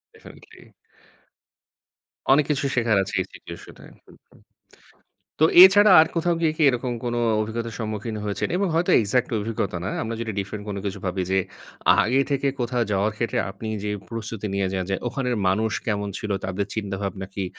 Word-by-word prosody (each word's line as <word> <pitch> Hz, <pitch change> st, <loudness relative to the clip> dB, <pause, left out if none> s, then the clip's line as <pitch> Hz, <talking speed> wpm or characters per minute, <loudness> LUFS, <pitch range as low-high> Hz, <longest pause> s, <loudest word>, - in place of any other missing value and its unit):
Definitely. -, -, -16 dB, 1.7 s
অনেক 140 Hz, +1 st, +5 dB
কিছু 140 Hz, -1 st, -1 dB
শেখার 115 Hz, -4 st, +2 dB
আছে 95 Hz, -, -8 dB
এই -, -, -3 dB
সিচুয়েশনে -, -, -12 dB, 0.2 s
হু, -, -, -18 dB, 0.2 s
হু। -, -, -23 dB, 1.1 s
তো -, -, +6 dB, 0.2 s
এছাড়া 205 Hz, +2 st, +8 dB
আর 160 Hz, -, +4 dB
কোথাও 170 Hz, +1 st, +1 dB
গিয়ে 160 Hz, -2 st, +2 dB
কি 160 Hz, -, -1 dB
এরকম 125 Hz, 0 st, -3 dB
কোনো 120 Hz, 0 st, -1 dB, 0.2 s
অভিজ্ঞতার 115 Hz, +1 st, -4 dB
সম্মুখীন 110 Hz, 0 st, -4 dB
হয়েছেন? 105 Hz, -1 st, -2 dB
এবং 200 Hz, -, +1 dB
হয়তো 170 Hz, +2 st, +1 dB
এক্সাক্ট 120 Hz, +4 st, 0 dB
অভিজ্ঞতা 105 Hz, -3 st, -3 dB
না। -, -, -2 dB
আমরা 115 Hz, 0 st, -3 dB
যদি 115 Hz, -2 st, -3 dB
ডিফারেন্ট 100 Hz, +1 st, -5 dB
কোনো 100 Hz, -1 st, -4 dB
কিছু 100 Hz, 0 st, -4 dB
ভাবি 90 Hz, +1 st, -1 dB
যে, 95 Hz, -, +2 dB, 0.6 s
আগে 130 Hz, +4 st, +2 dB
থেকে 140 Hz, 0 st, +1 dB
কোথাও 120 Hz, 0 st, 0 dB
যাওয়ার 100 Hz, +3 st, +1 dB
ক্ষেত্রে 115 Hz, +1 st, -1 dB
আপনি 105 Hz, +3 st, -8 dB, 0.2 s
যে 105 Hz, -, -2 dB, 0.2 s
প্রস্তুতি 115 Hz, -2 st, -5 dB
নিয়ে 100 Hz, -1 st, 0 dB
যান, 95 Hz, -1 st, -2 dB
যে -, -, +1 dB
ওখানের 125 Hz, -1 st, -2 dB
মানুষ 110 Hz, +3 st, 0 dB
কেমন 105 Hz, -2 st, -1 dB
ছিল, 105 Hz, -, -6 dB
তাদের 95 Hz, +1 st, -2 dB
চিন্তাভাবনা 100 Hz, -2 st, -4 dB
কি? 100 Hz, -, -2 dB
110 Hz, 170 wpm, -23 LUFS, 100-125 Hz, 1.7 s, এছাড়া